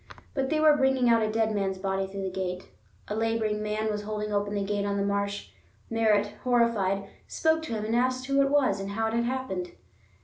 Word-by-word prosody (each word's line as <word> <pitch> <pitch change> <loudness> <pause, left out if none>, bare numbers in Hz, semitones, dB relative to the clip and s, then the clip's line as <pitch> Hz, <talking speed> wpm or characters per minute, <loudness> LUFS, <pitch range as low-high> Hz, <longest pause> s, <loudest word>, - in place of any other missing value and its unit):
But 270 -1 -1
they 310 0 +1
were 310 -1 +6
bringing 265 -3 +3
out 230 -1 +5
a 215 - +1
dead 220 0 +1
man's 195 -2 -1
body 195 0 -1
through 195 0 -6
the 190 - -2
gate. 180 0 -4 0.4
A - - -3
laboring 220 -1 0
man 215 +1 -1
was 210 0 -2
holding 210 0 -4
open 205 0 0
the 200 - 0
gate 205 0 -1
on 200 0 -1
the 200 - 0
marsh. 200 - -2 0.4
Merritt, 210 -2 +2
horrified, 225 -6 +2 0.2
spoke 320 0 +1
to 270 - -4
him 215 -1 -2
and 225 +2 0
asked 255 +1 +1
who 275 +1 +2
it 275 - +3
was, 275 -9 +2
and 195 0 -4
how 225 +2 -1
it 220 - -1
had 235 +1 +1
happened. 240 -9 -3
215 Hz, 225 wpm, -28 LUFS, 200-240 Hz, 0.4 s, were